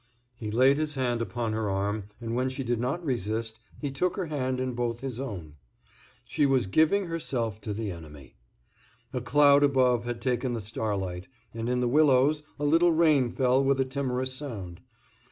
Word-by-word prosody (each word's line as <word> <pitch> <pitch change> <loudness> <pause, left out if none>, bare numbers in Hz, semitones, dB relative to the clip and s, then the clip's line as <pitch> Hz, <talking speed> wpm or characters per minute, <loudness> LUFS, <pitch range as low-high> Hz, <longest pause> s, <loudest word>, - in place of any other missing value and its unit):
He 110 -2 -6
laid 130 +6 +4
his 155 -1 -2
hand 120 -3 0
upon 115 -1 -2
her 110 -1 -1
arm, 100 +1 -1
and 115 -1 -4
when 130 +2 0
she 130 +1 -4
did 120 -2 -1
not 140 +9 -2
resist, 115 -3 -2 0.2
he 145 -2 -3
took 170 +7 0
her 190 - -1
hand 130 -5 -2
in 130 0 -2
both 120 -1 -2
his 130 -3 -5
own. 90 - -6 0.7
She 145 - +1
was 130 -4 +2
giving 160 - +3
herself 120 - -3
to 105 - -5
the 105 0 -3
enemy. 75 -6 -11 0.8
A 125 - -2
cloud 145 +3 +5
above 130 -4 +3
had 120 -1 -3
taken 125 0 -1
the 115 - -2
starlight, 100 -4 -3 0.3
and 115 +1 -3
in 125 0 +1
the 125 - +1
willows 145 +2 +4 0.2
a 145 - -1
little 165 +4 +4
rain 155 -6 +3
fell 130 +2 +2
with 135 0 +2
a 135 - +2
timorous 130 -1 -2
sound. 105 -11 -7
125 Hz, 185 wpm, -28 LUFS, 110-140 Hz, 0.8 s, cloud